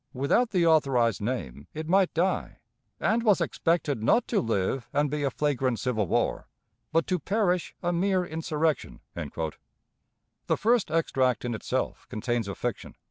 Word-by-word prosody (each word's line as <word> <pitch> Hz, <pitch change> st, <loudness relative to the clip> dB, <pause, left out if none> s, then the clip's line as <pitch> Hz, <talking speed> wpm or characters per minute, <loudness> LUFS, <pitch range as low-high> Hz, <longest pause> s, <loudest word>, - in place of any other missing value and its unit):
Without 140 Hz, -, +2 dB
the 180 Hz, -5 st, +2 dB
authorized 135 Hz, -, +3 dB
name, 70 Hz, -, -4 dB
it 155 Hz, 0 st, -4 dB
might 190 Hz, +1 st, +3 dB
die, 185 Hz, +3 st, 0 dB, 0.4 s
and 230 Hz, +2 st, +2 dB
was 210 Hz, -5 st, +4 dB
expected 155 Hz, -7 st, 0 dB
not 230 Hz, -, +3 dB
to 225 Hz, -, +2 dB
live 115 Hz, +2 st, -1 dB
and 145 Hz, -1 st, +1 dB
be 150 Hz, 0 st, -1 dB
a 140 Hz, -, +1 dB
flagrant 130 Hz, -3 st, 0 dB
civil 110 Hz, -3 st, 0 dB
war, -, -, 0 dB, 0.4 s
but 165 Hz, -, +2 dB
to 180 Hz, -1 st, 0 dB
perish 185 Hz, 0 st, 0 dB
a 175 Hz, 0 st, +1 dB
mere 185 Hz, +1 st, +1 dB
insurrection." 160 Hz, -2 st, -2 dB
The 80 Hz, -2 st, -7 dB
first 230 Hz, -3 st, +2 dB
extract 130 Hz, -7 st, +1 dB
in 120 Hz, -, -1 dB
itself 110 Hz, -, -3 dB
contains 115 Hz, 0 st, -2 dB
a 100 Hz, -, -4 dB
fiction. -, -, -4 dB
150 Hz, 150 wpm, -27 LUFS, 120-180 Hz, 0.4 s, was